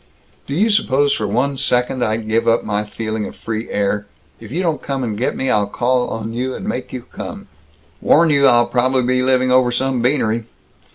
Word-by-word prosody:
"Do 140 - -3
you 215 +6 +3
suppose 145 -9 +2
for 105 - -2
one 130 +7 0
second 125 -1 +1
I'd 110 0 -1
give 110 +1 +1
up 115 0 +3
my 105 0 -1
feeling 110 0 -4
of - - -10
free 110 0 -5
air? 105 0 -1 0.3
If 110 -1 -11
you 175 +6 -1
don't 165 -3 -1
come 135 -2 -3
and 110 -4 -2
get 120 +5 -1
me, 130 - 0
I'll 105 -1 +2
call 125 +4 0
on 115 0 -5
you 130 +2 -2
and - - -7
make 125 - -4
you 125 -2 -6
come!" - - -8 0.5
"Warn 165 0 +4
you 140 -1 +5
I'll 120 -1 +5
probably 125 +2 +1
be 125 +1 +1
living 130 0 +2
over 130 -1 +4
some 130 0 0
beanery." 115 -3 +1
125 Hz, 210 wpm, -18 LUFS, 110-130 Hz, 0.5 s, you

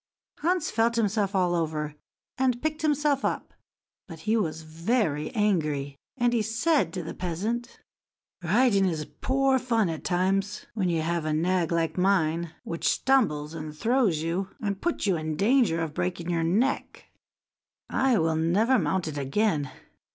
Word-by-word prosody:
Hans 345 0 0
felt 230 +1 +2
himself 210 -3 0
all 180 -2 +2
over, 155 -3 -2 0.4
and 255 -2 +1
picked 310 +3 -2
himself 295 -2 +1
up; - - -2 0.5
but 165 -3 -10
he 220 +4 +1
was 165 -7 -1
very 160 - -1
angry, 155 -10 0 0.2
and 240 -1 +2
said 225 - +1
to 180 - -4
the 160 - -6
peasant: 205 +8 -3 0.6
"Riding 200 +2 +3
is 155 -4 -2
poor 265 0 +1
fun 230 -6 +1
at 160 -1 -5
times, 195 +3 0
when 195 -5 0
you 165 -2 0
have 170 0 -1
a 155 - 0
nag 175 +1 +1
like 165 +1 0
mine, 170 -3 +1
which 165 - -1
stumbles 160 - +1
and 155 -1 -7
throws 225 - +2
you, 180 +4 -2
and 200 -3 -3
puts 345 -8 -1
you 190 -4 +2
in 155 0 -3
danger 210 - +3
of 155 -2 -4
breaking 175 0 -2
your 165 -1 0
neck. 215 +12 0 0.8
I 265 -3 +2
will 160 -1 +1
never 210 +10 +3
mount 190 -4 0
it 145 -2 -4
again. 145 0 0
185 Hz, 155 wpm, -27 LUFS, 160-230 Hz, 0.8 s, Riding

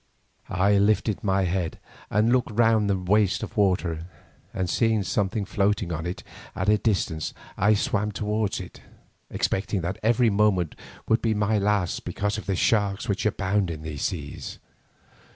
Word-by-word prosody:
I 100 +2 +3
lifted 105 0 +1
my 95 -1 +2
head 90 -2 -1 0.3
and 110 +3 +2
looked 125 -1 +2
round 110 -1 +3
the 100 - +2
waste 95 +2 +2
of - - -7
water, 90 -5 +1 0.4
and 95 -1 -2
seeing 110 +3 +2
something 100 +1 -1
floating 100 -2 0
on 80 +1 -3
it 90 - -5 0.3
at 95 +3 0
a 105 0 +4
distance, 90 -8 -1 0.2
I 105 +3 +3
swam 105 +1 0
towards 105 +1 -1
it, 90 - -10 0.5
expecting 95 0 -1
that 90 +5 -3
every 115 +1 +3
moment 100 -5 +2 0.3
would 110 - +2
be 110 -1 +1
my 105 +1 +1
last, 100 -3 0
because 105 +1 -2
of - - -10
the 100 - +1
sharks 100 0 +1
which 100 +1 0
abound 100 -2 0
in 80 -2 -6
these 80 -3 -5
seas. - - -4
100 Hz, 160 wpm, -25 LUFS, 95-105 Hz, 0.5 s, a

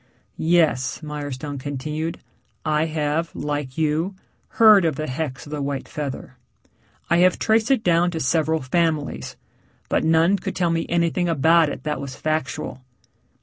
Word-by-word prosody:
"Yes," 155 -8 +2
Mirestone 145 -1 -5
continued. 150 +4 -4 0.5
"I 155 0 +2
have, 155 +1 -2
like 145 -3 -4
you, 160 +4 0 0.4
heard 215 -4 +8
of 160 -4 +1
the 155 - -3
hex 135 -1 -4
of 145 - -11
the 150 -1 -3
white 140 -1 -3
feather. 135 -3 -6 0.7
I 170 - +5
have 180 +1 +4
traced 220 +1 +2
it 265 -5 +2
down 175 0 +3
to 165 -2 -4
several 160 +2 +1
families, 150 - -1 0.5
but - - +1
none 165 +4 +4
could - - -5
tell 175 -2 +1
me 165 0 -1
anything 170 +1 +1
about 165 +1 +4
it - - -7
that 150 -1 -2
was 135 -1 -6
factual. 155 -3 -3
155 Hz, 150 wpm, -22 LUFS, 145-170 Hz, 0.7 s, heard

